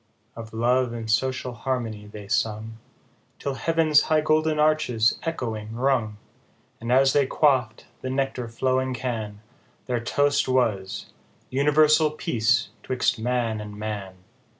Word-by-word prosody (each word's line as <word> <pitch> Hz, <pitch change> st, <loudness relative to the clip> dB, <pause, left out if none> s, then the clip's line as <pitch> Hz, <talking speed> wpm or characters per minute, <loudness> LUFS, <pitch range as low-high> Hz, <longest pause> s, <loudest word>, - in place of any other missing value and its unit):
Of 115 Hz, -1 st, -9 dB
love 120 Hz, +2 st, +1 dB
and 115 Hz, -1 st, -4 dB
social 130 Hz, +1 st, 0 dB
harmony 115 Hz, -4 st, -3 dB
they 105 Hz, -1 st, -10 dB
sung, 110 Hz, +2 st, -2 dB, 0.6 s
Till 140 Hz, -, -3 dB
heav'n's 160 Hz, +1 st, +3 dB
high 155 Hz, -1 st, +4 dB
golden 155 Hz, 0 st, +2 dB
arches 150 Hz, -7 st, +2 dB
echoing 115 Hz, -9 st, -4 dB
rung; 120 Hz, -4 st, 0 dB, 0.6 s
And 115 Hz, +1 st, -4 dB
as 135 Hz, +1 st, +5 dB
they 140 Hz, -2 st, +3 dB
quaff'd 130 Hz, -7 st, +1 dB, 0.2 s
the 130 Hz, -, -4 dB
nectar 130 Hz, -2 st, -2 dB
flowing 130 Hz, +2 st, 0 dB
can, 110 Hz, -4 st, -4 dB, 0.4 s
Their 125 Hz, -2 st, -1 dB
toast 145 Hz, +4 st, +1 dB
was, 115 Hz, -7 st, -1 dB, 0.2 s
" -, -, -36 dB
Universal 150 Hz, +3 st, +3 dB
peace 120 Hz, -5 st, +1 dB
'twixt 130 Hz, -2 st, 0 dB
man 115 Hz, -2 st, -1 dB
and 105 Hz, -1 st, -8 dB
man." 105 Hz, -3 st, -5 dB
125 Hz, 130 wpm, -25 LUFS, 110-135 Hz, 0.6 s, as